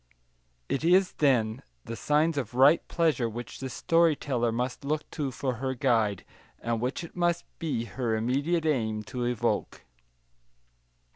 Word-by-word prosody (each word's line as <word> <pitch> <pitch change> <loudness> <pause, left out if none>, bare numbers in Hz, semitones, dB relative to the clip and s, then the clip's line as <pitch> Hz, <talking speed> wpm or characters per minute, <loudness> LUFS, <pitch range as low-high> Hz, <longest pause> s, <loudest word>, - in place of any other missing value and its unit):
It 140 - -2
is, 180 +3 +4
then, 120 -5 +2 0.2
the 115 - -5
signs 150 +5 +2
of 125 -4 -3
right 140 +6 +6
pleasure 150 -9 +1
which 120 +2 -7
the 135 - -4
story 165 +4 +3
teller 120 -5 -1
must 125 +4 -3
look 150 +2 -2
to 145 -3 -2
for 130 -1 -3
her 130 +2 -2
guide, 115 -7 +1 0.3
and 115 -1 -2
which 125 +7 -2
it 170 - -10
must 175 -1 0
be 150 -8 -1
her 120 -2 -2
immediate 140 +9 0
aim 110 -8 0
to 125 +1 -4
evoke. 120 -2 -1
130 Hz, 150 wpm, -28 LUFS, 120-155 Hz, 0.3 s, right